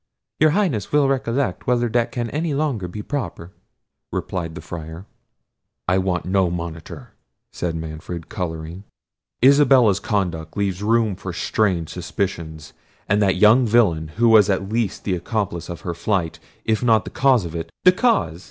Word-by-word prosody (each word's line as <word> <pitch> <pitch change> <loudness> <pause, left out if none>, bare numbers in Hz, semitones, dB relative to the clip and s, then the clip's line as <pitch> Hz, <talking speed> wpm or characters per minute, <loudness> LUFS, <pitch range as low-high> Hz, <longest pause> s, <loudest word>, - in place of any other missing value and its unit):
"Your 155 - +5
Highness 145 - 0
will 145 -1 +4
recollect 135 0 -1
whether 120 -1 +2
that 120 +1 0
can 120 -2 -3
any 155 0 -1
longer 135 -11 -1
be 105 +4 -7
proper," 120 -11 -5 0.6
replied 85 -3 -4
the 90 - -7
Friar. 80 +2 -8 0.8
"I 90 +1 +3
want 95 -2 -1
no 95 -1 +2
monitor," 85 -2 -7 0.4
said 85 -2 -3
Manfred, 80 +1 -6
colouring; 85 -3 -5 0.6
"Isabella's 130 -7 +5
conduct 90 -7 -2
leaves 100 -2 -1
room 110 -1 +2
for 90 0 -7
strange 90 -2 0
suspicions—and 90 +2 -4
that 95 -2 +3
young 110 +6 +5
villain, 100 -9 +3
who 120 +1 +4
was 105 -3 +6
at 95 0 0
least 110 -3 -2
the 95 - -1
accomplice 90 -2 -3
of 85 -3 -7
her 85 - -4
flight, 85 -2 -1 0.3
if 110 -1 +1
not 110 -5 +3
the - - -7
cause 130 -7 +3
of 80 - -7
it—" 85 -1 -5
"The 180 - +8
cause!" 180 - +1
100 Hz, 155 wpm, -21 LUFS, 85-120 Hz, 0.8 s, The